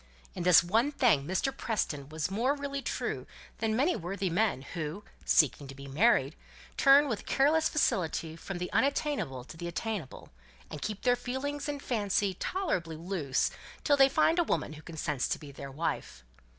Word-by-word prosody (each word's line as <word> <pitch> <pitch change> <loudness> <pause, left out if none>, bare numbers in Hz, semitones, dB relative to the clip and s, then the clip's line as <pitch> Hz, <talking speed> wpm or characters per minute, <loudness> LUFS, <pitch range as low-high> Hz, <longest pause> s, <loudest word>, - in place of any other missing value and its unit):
In - - -5
this 180 0 +7
one 225 +11 +2
thing 210 - +3
Mr. 225 +9 -1
Preston 150 - -2
was 155 +3 -3
more 245 +8 +1
really 280 -1 -4
true - - -3 0.3
than 220 -1 0
many 290 +9 +2
worthy 190 +2 -3
men; 190 - +1
who, 165 +5 -5 0.2
seeking 145 -2 +3
to 135 - -9
be 140 +1 -10
married, 145 - +3 0.4
turn 280 +1 +6
with 225 -6 -4
careless 310 +4 +3
facility 165 - 0
from 180 +3 -6
the 180 0 -4
unattainable 275 - 0
to 135 - -12
the 170 +1 -5
attainable, 180 - -5 0.4
and 150 - -6
keep 210 -2 -4
their 245 -1 +4
feelings 280 +4 -4
and 285 -1 -4
fancy 205 -4 0
tolerably 185 - -2
loose 160 -5 -1 0.3
till 290 - +4
they 270 -1 +6
find 325 +5 +3
a - - +5
woman 160 - -1
who 150 - -11
consents 150 -4 -2
to - - -1
be 145 -3 -10
their 140 0 -8
wife. 150 - -4
195 Hz, 175 wpm, -30 LUFS, -, 0.4 s, this